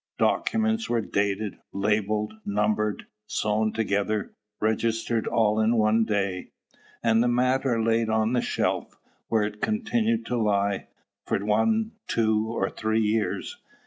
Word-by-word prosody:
Documents 225 0 +1
were 120 -1 +1
dated, 100 0 -1
labelled, 105 +1 0
numbered, 105 +1 0 0.2
sewed 110 0 0
together, 105 -1 -1 0.3
registered 115 +1 0
all 110 -2 +2
in 110 +2 +3
one 110 0 +3
day, 100 -4 -1 0.5
and 115 -1 +4
the 120 - +3
matter 125 0 +2
laid 115 0 +1
on 110 +1 +1
the 125 - +2
shelf, - - -2 0.3
where 110 -2 +2
it 105 0 -4
continued 225 +1 0
to 125 - -1
lie, 100 -2 +1 0.4
for - - +1
one, 215 - +2 0.2
two, 110 -1 +1
or 115 - -1
three 110 0 0
years. 110 - -1
110 Hz, 130 wpm, -26 LUFS, 105-120 Hz, 0.5 s, and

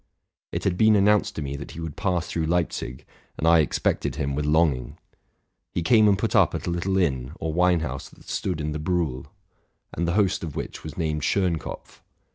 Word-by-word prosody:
It - - -3
had 90 -2 0
been 110 -1 +6
announced 105 +1 +3
to 80 - -3
me 70 0 -4
that 70 +3 -8
he 80 - -8
would 80 -2 -5
pass 95 -4 0
through 80 -1 -2
Leipzig, 80 -7 -2 0.3
and - - -2
I 85 0 +7
expected 75 - 0
him 70 0 -2
with 75 +1 -1
long 80 -1 +4
ing. 60 -1 -9 0.7
He 85 - -2
came 110 +3 +5
and 100 -1 +4
put - - -1
up - - +4
at - - -4
a - - -1
little 90 +3 0
inn 65 -7 0
or 80 -1 -2
wine 90 0 +3
house 65 -3 -5
that - - -19
stood - - -2
in 75 0 -2
the 75 - -3
Briuhl 80 -6 -1
(Marsh), - - -19 0.7
and 85 +1 -1
the 85 - +1
host 100 -2 +2
of 80 -4 -5
which - - -5
was 80 -1 -8
named 80 -3 -1
Schénkopf. 90 0 -2
80 Hz, 220 wpm, -25 LUFS, 75-90 Hz, 0.7 s, I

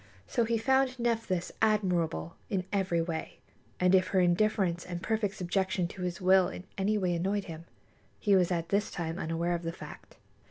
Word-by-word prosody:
So 235 -3 0
he 230 0 +1
found 265 +2 +2
Nephthys 225 -7 -1
admirable 180 -7 +1
in 190 -4 -1
every 185 -4 +1
way; 165 -1 -5 0.4
and 180 +1 +4
if 185 -1 +5
her 190 - +2
indifference 180 -1 +2
and 175 -1 -5
perfect 215 -3 0
subjection 185 0 0
to 190 - -9
his 180 -1 -3
will 185 0 +5
in 185 - -8
any 210 +2 +1
way 180 -3 +1
annoyed 195 +4 0
him, 165 -2 -9 0.5
he 205 -3 +3
was 185 -1 +3
at 170 -1 -1
this 205 +2 +1
time 165 -1 -4
unaware 165 +2 -1
of 170 - -2
the 165 -1 -3
fact. 165 - -11
185 Hz, 185 wpm, -30 LUFS, 175-210 Hz, 0.5 s, if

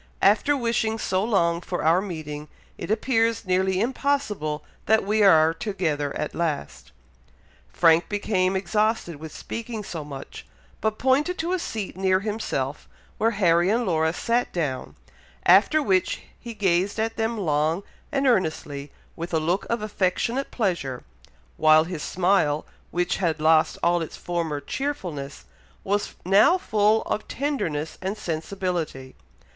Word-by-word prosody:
After 250 +9 +4
wishing 230 -2 0
so 190 -3 0
long 170 -6 +1
for 175 0 -4
our 165 +4 +4
meeting, 155 -6 -6 0.3
it - - -7
appears 225 0 +1
nearly 185 0 +1
impossible 220 - -1 0.2
that 220 -1 +4
we 215 +2 +1
are 160 -5 +6
together 160 -8 -2
at 150 - -3
last." 155 - -3 0.8
Frank 165 0 +4
became 195 -2 0
exhausted 205 -2 0
with 155 +1 -9
speaking 230 -1 -6
so 165 -5 -6
much, 140 -2 -9 0.4
but 220 0 0
pointed 285 +7 +2
to 340 +3 -1
a 370 - 0
seat 220 - -4
near 190 0 +2
himself, 200 -10 -3 0.3
where 225 - +3
Harry 175 -2 +4
and 235 +3 +1
Laura 160 -3 +2
sat 235 +7 0
down, 145 -7 -3 0.5
after 200 - +5
which 190 -7 +1 0.2
he 235 -2 -8
gazed 190 -1 +1
at 225 +1 -1
them 225 +1 -1
long 160 0 0 0.3
and 275 0 0
earnestly, 155 - 0 0.2
with 170 0 -4
a - - +3
look 175 +5 -1
of 230 -2 -1
affectionate 215 +6 -1
pleasure, 170 - -2 0.5
while 155 0 +6
his 165 -2 -5
smile, 175 -5 +1 0.2
which 175 0 0
had 165 -4 0
lost 155 0 +3
all 175 0 +3
its 160 - -6
former 165 -4 -2
cheerfulness, 170 - -5 0.4
was 205 +1 -1
now 205 - +5
full 215 - +2
of 215 - -3
tenderness 165 - -2
and 190 +3 -3
sensibility. 165 -6 -3
185 Hz, 140 wpm, -25 LUFS, 160-220 Hz, 0.8 s, are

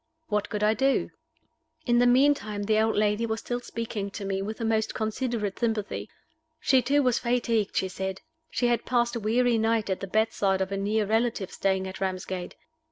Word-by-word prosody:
What 210 -1 0
could 210 -1 -2
I 215 +1 +4
do? 270 +3 +1 0.7
In 240 -1 +3
the 245 - +5
meantime 245 -5 +3
the 215 +1 +2
old 220 0 +2
lady 210 +2 +1
was 220 0 -2
still 245 +1 -3
speaking 230 -4 -4
to 200 0 -6
me 195 0 -1
with 215 +3 -4
the 230 - -3
most 220 -1 0
considerate 220 -2 -2
sympathy. 210 - -2 0.5
She 260 -2 +4
too 285 +3 +2
was 250 -2 +2
fatigued, 235 -3 0
she 190 - +1
said. 190 +1 -4 0.3
She 245 - -1
had 240 -1 +2
passed 240 -1 +1
a - - -1
weary 230 +2 +2
night 225 -2 +1
at 190 - -1
the 195 - -5
bedside 200 -2 +1
of 190 0 -2
a - - -1
near 210 +2 +1
relative 220 -2 0
staying 190 -1 0
at 190 0 -7
Ramsgate. 185 -1 -3
220 Hz, 195 wpm, -27 LUFS, 200-240 Hz, 0.7 s, the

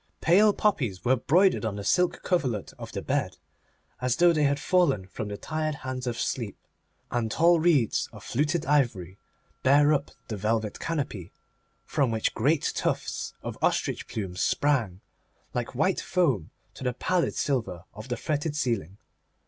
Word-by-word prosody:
Pale 205 +5 +5
poppies 125 - 0
were 130 +2 +5
broidered 180 +9 +3
on 110 -3 -2
the 100 - -5
silk 180 - +1
coverlet 130 - -1
of - - -7
the - - -5
bed, - - -1 0.6
as 125 0 +1
though 175 0 +5
they 150 -2 +2
had 140 0 +1
fallen 145 - +2
from 105 +3 -6
the 100 0 -5
tired 155 +2 -2
hands 130 -1 -4
of 120 -1 -2
sleep, 115 -6 -2 0.5
and 120 -2 0
tall 165 +8 +4
reeds 155 - +2
of - - -12
fluted 155 +5 0
ivory 115 - 0 0.4
bare 145 +3 +5
up 140 -1 -1 0.2
the 110 - -4
velvet 110 +1 -1
canopy, 130 - -3 0.5
from 140 -5 +1
which 110 -1 0
great 145 +6 +1
tufts - - -2
of - - -6
ostrich - - 0
plumes 95 -4 -4
sprang, 115 -11 +1 0.5
like 120 +1 -3
white 170 +8 +1
foam, 135 - +1 0.2
to - - -10
the 125 -1 0
pallid 175 +7 0
silver 110 - -1
of 110 +4 -9
the 125 -2 -2
fretted 150 +3 -2
ceiling. 115 - -1
130 Hz, 160 wpm, -27 LUFS, 110-155 Hz, 0.6 s, Pale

